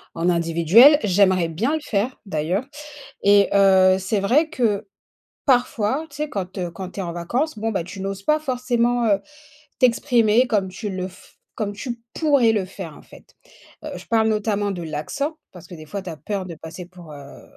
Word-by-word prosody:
en 170 +2 0
individuel, 170 - +5
j'aimerais 185 -3 +3
bien 215 - -1
le 315 - 0
faire, 225 +1 -2
d'ailleurs, 180 +5 -2 0.6
et 200 0 +5
heu, 190 -1 +5
c'est 195 +2 -1
vrai 280 +11 +2
que 220 -9 -1 0.6
parfois, 250 +1 +1
tu 285 - -13
sais, 300 0 -3
quand, 190 -1 -5
heu, 180 -2 -2
quand 185 +2 -7
tu - - -8
es - - -1
en 170 -1 -5
vacances, 235 - -2
bon, 225 +1 -2
bah, 190 -5 -1
tu 190 +3 -9
n'oses 195 0 -5
pas 305 +5 +2
forcément, 245 -4 0
heu, 200 -2 +3 0.6
t'exprimer 240 -2 +3
comme 205 -5 0
tu 200 +3 -6
le 185 -1 -4
f 185 - -18 0.2
comme 210 -3 -3
tu 235 +2 -6 0.2
pourrais 280 -8 +3
le 205 -3 0
faire, 185 -4 -9
en - - -15
fait. - - -18 0.5
Heu, - - -5
je - - -11
parle 220 -1 +2
notamment 210 -1 0
de 180 -3 -5
l'accent, 225 - -4 0.2
parce 180 -3 -13
que, 180 - -11
des 155 - -10
fois, 200 +6 -5
tu 185 - -8
as 160 - -7
peur 190 +5 -4
de 170 - -7
passer 165 +3 -9
pour, 175 -4 -13
heu, 140 -1 -12
200 Hz, 200 wpm, -22 LUFS, 180-240 Hz, 0.6 s, individuel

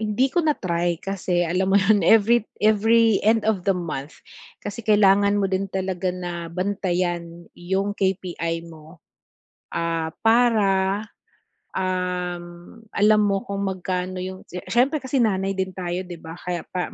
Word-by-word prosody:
hindi 220 +5 +1
ko 350 - +3
na-try 175 - 0
kasi 185 -2 -1
alam 190 +3 +1
mo - - +7
'yon, 205 +1 +4
every 225 +5 +4 0.2
every 220 +1 +4
end 220 +1 +2
of 210 -4 0
the 190 - +3
month 155 -4 -5 0.5
kasi 205 +3 -5
kailangan 205 -1 +4
mo 200 - +1
din 195 +1 -1
talaga 190 -1 -2
na 175 -2 -5
bantayan 175 -2 -2
'yong 190 +3 -2
KPI 175 -4 -2
mo, 160 0 -13 0.8
ah, 165 -1 -2
para, 210 -4 +3 0.7
um, 180 -1 -2 0.5
alam 210 +1 +4
mo 195 -1 +1
kung 200 0 -3
magkano 185 -1 -3
'yong 185 0 -7
si 180 0 -7
siyempre 270 +5 +2
kasi 265 +1 -2
nanay 195 -2 0
din 190 -1 -2
tayo, 180 0 -4
'di 175 -1 -8
ba? 165 +2 -9
Kaya 180 -2 -4
pa 180 -1 -3
190 Hz, 145 wpm, -23 LUFS, 175-205 Hz, 0.8 s, mo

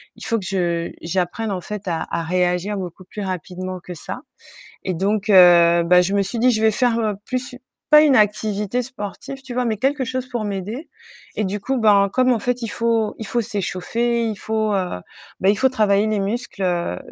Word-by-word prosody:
Il - - -10
faut 230 -2 0
que 190 - -8
je 170 -3 -1
j'apprenne 185 +5 -2
en 185 - -2
fait 210 +1 -6
à 165 -1 -2
à 165 - -2
réagir 180 +3 0
beaucoup 185 -1 -7
plus 205 +2 -8
rapidement 185 0 -5
que 180 - -8
ça». 160 - -7 0.6
Et 185 - -1
donc 205 +3 0
heu, 170 -2 +7
bah 180 +1 +5
je 190 +3 -1
me 200 - +3
suis 225 +5 -4
dit: 250 +1 +5
«Je 220 -2 0
vais 220 -1 +4
faire 240 0 +1 0.3
plus 255 0 -3
u 250 - -12 0.3
pas 300 0 +9
une 285 -4 +5
activité 210 +1 +1
sportive». 255 +3 -8
Tu 250 - -7
vois? 250 -1 0
Mais 220 -2 0
quelque 270 +2 0
chose 255 +1 -3
pour 240 -4 -3
m'aider 205 - -5 0.5
et 215 - 0
du 200 +2 -3
coup, 265 +4 -1
ben, 200 -3 +5
comme 255 0 +3
en 230 - +1
fait, 245 +1 -2
il 230 - -2
faut 230 -1 0
il 220 - -6
faut 240 - 0
s'échauffer, 230 +5 -1
il 215 -2 -3
faut 220 -1 -1
heu, 180 - -2 0.4
bah, 190 - +2
il 205 - +1
faut 265 - +4
travailler 210 -4 +2
les 215 -2 0
muscles, 205 0 -3
heu, 175 - -1
210 Hz, 215 wpm, -21 LUFS, 185-235 Hz, 0.6 s, pas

